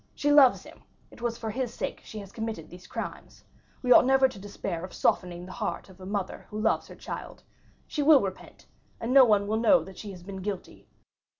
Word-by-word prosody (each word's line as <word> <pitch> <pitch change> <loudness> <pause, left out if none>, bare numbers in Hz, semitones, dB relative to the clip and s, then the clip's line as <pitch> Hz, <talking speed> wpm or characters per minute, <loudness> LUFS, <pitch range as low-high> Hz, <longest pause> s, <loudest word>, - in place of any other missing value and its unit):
She 290 - +1
loves 280 -4 +6
him; - - -15 0.3
it - - -15
was 235 -1 -2
for 225 -2 -4
his 250 +1 -2
sake - - -4
she 220 - -10
has 200 -2 -8
committed 220 -8 -5
these 180 +1 -12
crimes. - - -7 0.4
We 250 - +1
ought - - +9
never 265 0 +5
to 215 - -10
despair 190 -3 -5
of 185 - -8
softening 175 -1 0
the 185 - -10
heart 210 -2 -4
of 190 0 -16
a 185 - -8
mother 200 -2 -4
who 210 - -5
loves 220 +1 +1
her - - -11
child. - - -8 0.4
She 300 - -3
will 290 -1 +7
repent, 190 -1 -7 0.3
and 235 +3 -2
no 270 -2 +9
one 205 -3 +3
will 215 +2 0
know 260 +4 +5
that 190 -1 -12
she 210 - -7
has 180 -3 -10
been 195 +1 -7
guilty. 195 -1 -6
210 Hz, 220 wpm, -28 LUFS, 190-245 Hz, 0.4 s, ought